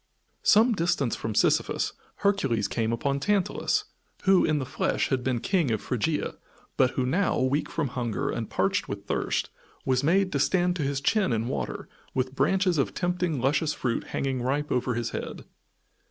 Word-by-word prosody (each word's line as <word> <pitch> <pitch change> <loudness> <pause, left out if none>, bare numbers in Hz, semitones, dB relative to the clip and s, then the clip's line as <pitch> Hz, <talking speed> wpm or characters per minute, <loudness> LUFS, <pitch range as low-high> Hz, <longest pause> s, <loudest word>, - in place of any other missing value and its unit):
Some 225 +3 +5
distance 165 - 0
from 110 -2 -4
Sisyphus - - +2 0.3
Hercules 135 - +2
came 115 -1 -1
upon 140 +4 0
Tantalus, 200 +4 +1 0.4
who, 190 -1 +5
in 155 - +2
the 135 - -2
flesh, 130 - -1
had 130 -2 0
been 125 -2 0
King 170 - +1
of 110 -2 0
Phrygia, 140 +8 -2 0.4
but 130 - +4
who 130 - +2
now, 180 +10 +1
weak 130 +4 +1
from 150 -5 -1
hunger 120 -4 -2
and - - -4
parched - - 0
with - - -5
thirst, - - -1 0.3
was 130 0 +2
made 185 +5 +3
to - - 0
stand 180 -1 +2
to - - -2
his 140 -1 -1
chin 205 - +2
in 115 0 0
water 130 - -4 0.3
with 130 0 -1
branches 185 +2 +2
of 135 - 0
tempting 180 -4 0
luscious 145 +4 +1
fruit 120 -3 -2
hanging 135 -2 -2
ripe 145 +4 -1
over 125 -1 0
his 120 -1 -2
head. - - -6
140 Hz, 175 wpm, -27 LUFS, 125-180 Hz, 0.4 s, Some